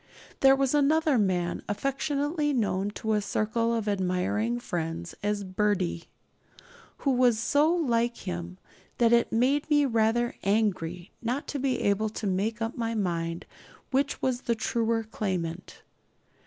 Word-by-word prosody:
There 270 Hz, 0 st, +6 dB
was 270 Hz, 0 st, +1 dB
another 295 Hz, -1 st, +3 dB
man, 180 Hz, -4 st, 0 dB
affectionately 290 Hz, -, -1 dB
known 205 Hz, -5 st, 0 dB
to 220 Hz, 0 st, -1 dB
a 210 Hz, -, +2 dB
circle 220 Hz, +3 st, 0 dB
of 225 Hz, -2 st, -2 dB
admiring 200 Hz, +4 st, 0 dB
friends 170 Hz, -4 st, -4 dB
as 205 Hz, 0 st, -1 dB
'Birdie,' 185 Hz, -3 st, -1 dB, 1.0 s
who 275 Hz, -, +4 dB
was 245 Hz, -3 st, +4 dB
so 290 Hz, +7 st, +3 dB
like 240 Hz, -8 st, +1 dB
him 180 Hz, -1 st, -6 dB, 0.4 s
that 235 Hz, -1 st, +4 dB
it 235 Hz, 0 st, +3 dB
made 270 Hz, +6 st, +2 dB
me 290 Hz, -1 st, +4 dB
rather 230 Hz, 0 st, +1 dB
angry 190 Hz, -4 st, 0 dB
not 245 Hz, +5 st, -2 dB
to 285 Hz, -, -3 dB
be 260 Hz, -2 st, 0 dB
able 205 Hz, +2 st, +1 dB
to 215 Hz, -, -6 dB
make 210 Hz, +4 st, -1 dB
up 225 Hz, +2 st, -3 dB
my 230 Hz, -2 st, -2 dB
mind 170 Hz, -4 st, -2 dB, 0.5 s
which 275 Hz, +2 st, 0 dB
was 255 Hz, -1 st, 0 dB
the 235 Hz, -, 0 dB
truer 225 Hz, 0 st, 0 dB
claimant. 185 Hz, -5 st, -4 dB
225 Hz, 140 wpm, -28 LUFS, 195-255 Hz, 1.0 s, There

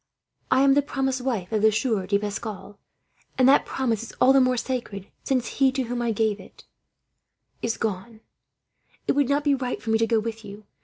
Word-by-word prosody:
I 260 Hz, -, +4 dB
am 275 Hz, 0 st, +5 dB
the 285 Hz, -, +4 dB
promised 265 Hz, -2 st, -2 dB
wife 230 Hz, -8 st, -3 dB
of 215 Hz, -2 st, 0 dB
the 220 Hz, 0 st, +5 dB
Sieur 220 Hz, -3 st, -1 dB
de 200 Hz, -, +2 dB
Pascal, 205 Hz, 0 st, -6 dB, 0.6 s
and 260 Hz, -1 st, +5 dB
that 275 Hz, -, +5 dB
promise 235 Hz, -5 st, -1 dB
is 230 Hz, -, -9 dB
all 265 Hz, -, +4 dB
the 270 Hz, -, +5 dB
more 255 Hz, 0 st, +2 dB
sacred, 235 Hz, -6 st, -4 dB
since 255 Hz, -3 st, 0 dB
he 270 Hz, +3 st, +2 dB
to 265 Hz, -1 st, -1 dB
whom 245 Hz, 0 st, -3 dB
I 235 Hz, -1 st, 0 dB
gave 215 Hz, -1 st, 0 dB
it," -, -, -9 dB
and -, -, -15 dB
she -, -, -40 dB
paused -, -, -28 dB
"is 230 Hz, -1 st, -2 dB
gone. 220 Hz, +1 st, -4 dB, 0.9 s
It -, -, +3 dB
would 280 Hz, -2 st, +1 dB
not 285 Hz, +1 st, +1 dB
be 290 Hz, -1 st, +3 dB
right 255 Hz, -2 st, -2 dB
for 225 Hz, -, -4 dB
me 220 Hz, -, +3 dB
to 225 Hz, -, +2 dB
go 225 Hz, -1 st, +2 dB
with 225 Hz, 0 st, -5 dB
you. 205 Hz, +1 st, -11 dB
230 Hz, 225 wpm, -24 LUFS, 215-265 Hz, 0.9 s, am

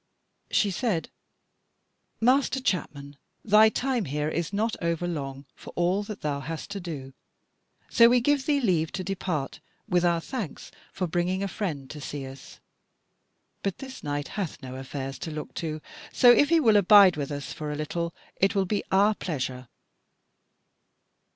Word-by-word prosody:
She 205 Hz, -, +2 dB
said: 185 Hz, -3 st, -1 dB, 1.1 s
"Master 260 Hz, +3 st, +3 dB
chapman, 145 Hz, -, -3 dB, 0.3 s
thy 215 Hz, +1 st, +7 dB
time 250 Hz, -2 st, -1 dB
here 150 Hz, +1 st, -2 dB
is 165 Hz, +2 st, -2 dB
not 220 Hz, +3 st, 0 dB
over 170 Hz, 0 st, -1 dB
long 140 Hz, -4 st, -5 dB
for -, -, -12 dB
all 180 Hz, +3 st, +1 dB
that 205 Hz, -1 st, -7 dB
thou 145 Hz, -2 st, -1 dB
hast 160 Hz, +6 st, -6 dB
to 200 Hz, -, -4 dB
do; 145 Hz, -7 st, -7 dB, 0.7 s
so 235 Hz, 0 st, +6 dB
we 245 Hz, +1 st, +5 dB
give 275 Hz, +2 st, +1 dB
thee 290 Hz, -2 st, +3 dB
leave 175 Hz, -, +1 dB
to 190 Hz, -, -3 dB
depart 180 Hz, -7 st, -3 dB, 0.3 s
with 180 Hz, -4 st, +2 dB
our 170 Hz, -1 st, +3 dB
thanks 215 Hz, -, -6 dB, 0.2 s
for 185 Hz, -, -2 dB
bringing 175 Hz, +3 st, -1 dB
a -, -, 0 dB
friend 160 Hz, -9 st, -4 dB
to 150 Hz, -, -8 dB
see 140 Hz, 0 st, -5 dB
us. 135 Hz, 0 st, -11 dB, 1.0 s
But 195 Hz, -2 st, -2 dB
this 265 Hz, -1 st, -9 dB
knight 145 Hz, 0 st, -3 dB
hath 185 Hz, -9 st, -4 dB
no 130 Hz, -1 st, -7 dB
affairs 135 Hz, +1 st, -6 dB
to -, -, -5 dB
look 150 Hz, -1 st, -6 dB
to: 155 Hz, -2 st, -4 dB, 0.3 s
so 245 Hz, -2 st, +7 dB
if 285 Hz, +4 st, +5 dB
he 335 Hz, -1 st, +5 dB
will 225 Hz, -8 st, +5 dB
abide 200 Hz, -2 st, +7 dB
with 145 Hz, -2 st, -3 dB
us 145 Hz, -1 st, -5 dB
for 150 Hz, -1 st, -5 dB
a -, -, -3 dB
little, 170 Hz, +3 st, -3 dB, 0.3 s
it 195 Hz, +3 st, +2 dB
will 195 Hz, -1 st, +2 dB
be 205 Hz, +2 st, -1 dB
our 200 Hz, +3 st, +5 dB
pleasure." 130 Hz, -, -4 dB
175 Hz, 165 wpm, -27 LUFS, 150-210 Hz, 1.1 s, thy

